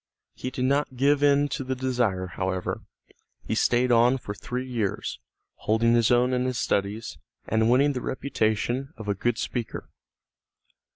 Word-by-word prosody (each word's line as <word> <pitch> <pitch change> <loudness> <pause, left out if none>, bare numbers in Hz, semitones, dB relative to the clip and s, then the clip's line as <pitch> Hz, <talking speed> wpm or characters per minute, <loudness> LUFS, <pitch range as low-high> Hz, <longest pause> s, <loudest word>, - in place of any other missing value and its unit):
He 130 - -5
did 130 0 -2
not 140 0 +1
give 140 +2 +3
in 145 0 +4
to 135 - -3
the 130 0 -2
desire, 120 -8 0
however. 95 0 -3 0.6
He - - -2
stayed 125 +1 +2
on 120 +2 +5
for 105 -5 -6
three 125 +5 -5
years, 115 -6 -2 0.4
holding 115 +2 +2
his 115 -2 +4
own 125 +1 +3
in 125 0 +1
his 130 -1 -1
studies, 105 +1 -2 0.3
and 110 +1 +2
winning 140 +4 +4
the 125 - -3
reputation 130 +2 -1
of 110 - -8
a 100 - +2
good 120 +4 -1
speaker. 120 -3 -4
125 Hz, 160 wpm, -26 LUFS, 110-130 Hz, 0.6 s, on